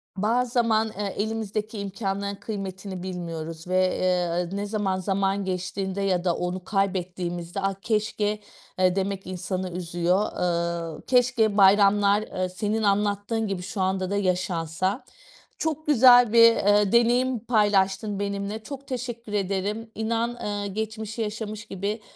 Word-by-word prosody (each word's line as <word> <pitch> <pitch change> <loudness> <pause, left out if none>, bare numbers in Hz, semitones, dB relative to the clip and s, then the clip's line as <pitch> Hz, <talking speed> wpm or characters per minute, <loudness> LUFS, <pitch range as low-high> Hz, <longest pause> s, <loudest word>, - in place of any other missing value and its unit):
Bazı 235 +5 +1
zaman, 225 -2 +2
eee, 205 -2 -2
elimizdeki 215 0 -3
imkânların 200 0 -3
kıymetini 190 -3 -6
bilmiyoruz 165 -2 -6
ve, 185 0 +2
eee, 180 0 0
ne 205 - -2
zaman 205 -3 -1
zaman 195 +1 0
geçtiğinde 190 +1 -3
ya 185 -3 +1
da 175 -2 +1
onu 180 +1 -3
kaybettiğimizde 180 -2 -2
ah 195 0 0
keşke, 210 -1 0 0.4
eee, 185 0 +3
demek 195 -1 -2
insanı 185 0 -3
üzüyor. 175 +3 0
Iıı, 170 -2 -2
keşke 240 -4 +3
bayramlar, 200 +1 +5
ııı, 185 -3 -3
senin 210 +4 -2
anlattığın 205 +2 +1
gibi 195 -2 -3
şu 190 +1 -4
anda 190 0 0
da 200 - -1
yaşansa. 185 - -1 0.5
Çok 310 -1 -3
güzel 245 -4 +7
bir, 230 0 +8
ııı, 205 -1 +3
deneyim 240 +1 +3
paylaştın 205 -2 +2
benimle. 200 +2 -3
Çok 275 +2 -8
teşekkür 240 -4 -5
ederim, 205 +3 -2
inan, 230 +1 0
ııı, 205 -1 -2
geçmişi 220 +2 -4
yaşamış 215 0 -4
gibi, 205 +3 -4
200 Hz, 135 wpm, -25 LUFS, 185-220 Hz, 0.5 s, bir